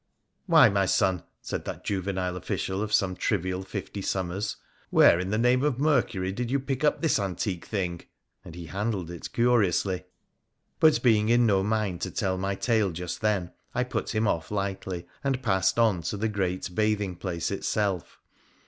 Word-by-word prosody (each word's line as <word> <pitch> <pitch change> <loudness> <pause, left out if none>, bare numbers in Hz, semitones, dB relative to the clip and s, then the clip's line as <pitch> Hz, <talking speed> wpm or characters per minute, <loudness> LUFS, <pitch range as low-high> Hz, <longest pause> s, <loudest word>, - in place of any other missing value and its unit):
' - - -51
Why, - - +7
my 100 -1 +1
son,' 95 -1 +2 0.2
said - - -4
that - - -6
juvenile 95 -2 -2
official 95 +2 -3
of 105 0 -3
some 95 -3 +2
trivial 95 -2 -1
fifty 100 +1 -6
summers, 95 +1 -2 0.2
' - - -36
where, 85 - +6
in 90 +1 -2
the 105 - 0
name 125 +3 +3
of 145 -5 +1
Mercury, 120 -10 +1
did 120 +4 -3
you 140 +2 +1
pick 135 +1 -3
up 150 - +2
this 160 - +3
antique 95 -2 -3
thing? 90 -5 -2 0.2
' - - -52
and 85 - -10
he 85 -1 -7
handled 95 -1 -3
it 85 - -7
curiously. 100 -6 +2 0.7
But 155 -1 +5
being 110 -3 +4
in 120 0 +5
no 100 -4 +3
mind 105 -3 -1
to - - -2
tell 95 -2 -1
my 95 +1 -1
tale 110 -1 +1
just 90 0 -5
then, 100 -5 0 0.2
I 125 - +2
put 125 -2 -3
him 110 0 +2
off 80 -4 -1
lightly, 95 -3 -3 0.2
and 135 -2 -1
passed 95 -5 +2
on 115 -5 +4
into 85 +5 -4
the 110 +2 0
great 95 -3 -2
bathing 105 -2 0
place 85 -1 -3
itself. 100 -2 -2
100 Hz, 185 wpm, -27 LUFS, 90-110 Hz, 0.7 s, Why